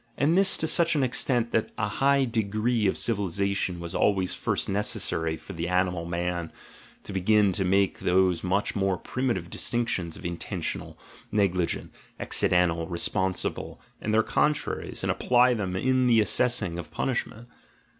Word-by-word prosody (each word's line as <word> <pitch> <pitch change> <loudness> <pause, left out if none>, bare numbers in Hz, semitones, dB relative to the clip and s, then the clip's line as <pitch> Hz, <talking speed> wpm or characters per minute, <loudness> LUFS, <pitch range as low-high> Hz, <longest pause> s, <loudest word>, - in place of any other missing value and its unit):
— - - -36
And 145 +6 +2
this 195 0 +4
to - - -1
such 170 +1 +2
an 145 - +2
extent, 120 -1 0
that 110 - 0
a 105 - 0
high 135 +6 +2
degree 110 0 0
of 95 - 0
civilisation 100 -3 -1
was 85 -1 -6
always 95 -3 +1
first - - -1
necessary 80 -5 -1
for 95 - -10
the 85 0 -3
animal 90 -1 0
man 85 -1 -3 0.5
to 100 - -7
begin 100 +2 +3
to 95 - -1
make 95 +1 +1
those 90 -1 +2
much 95 +3 0
more 95 -2 +1
primitive 115 -7 -3
dis - - -1
tinctions 95 -9 -1
of - - -12
"intentional," 85 -1 -4 0.3
"negligent," 95 -5 0 0.3
"accidental," 85 -2 +2
"re 85 - -4
sponsible," 95 +1 -2 0.2
and 110 - -2
their 110 +1 +4
contraries, 150 +5 -1
and - - +1
apply 125 0 +3
them 95 -5 -3
in 130 +5 +2
the 115 -2 +5
assessing 105 -4 +1
of 85 - -7
punishment. 120 -2 -3
100 Hz, 160 wpm, -26 LUFS, 90-120 Hz, 0.5 s, the